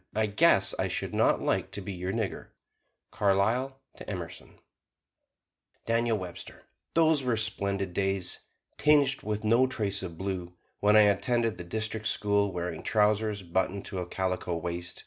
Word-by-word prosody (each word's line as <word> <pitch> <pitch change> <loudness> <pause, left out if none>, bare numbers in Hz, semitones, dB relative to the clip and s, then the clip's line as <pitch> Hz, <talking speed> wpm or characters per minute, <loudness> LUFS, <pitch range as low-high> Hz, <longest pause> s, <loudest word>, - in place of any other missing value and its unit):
"I 110 0 +2
guess 100 - +4
I - - +1
should - - -3
not - - +2
like - - 0
to - - -3
be 100 - -6
your 90 +1 -3
nigger!" 110 -3 -3 0.6
Carlyle 115 +7 +1 0.2
to - - -9
Emerson 90 -5 -6
[Illustration: - - -24 1.2
DANIEL 115 -1 +1
WEBSTER] 90 -3 -9 0.3
Those 160 -3 +4
were 125 -3 0
splendid 100 -3 -1
days, 95 -1 0 0.4
tinged 145 -3 +4
with 105 0 -3
no 115 +4 +4
trace 105 -5 -2
of 85 -3 -7
blue, 95 -2 -4 0.3
when 105 +1 +4
I 110 - +9
attended 110 +1 +2
the - - -5
district 110 +4 -3
school, 100 -2 +1
wearing 85 -2 -4
trousers 105 -1 +1
buttoned 95 +3 -1
to 95 - -4
a 90 - -4
calico 90 -2 -2
waist. 85 +1 -5
100 Hz, 155 wpm, -29 LUFS, 95-110 Hz, 1.2 s, I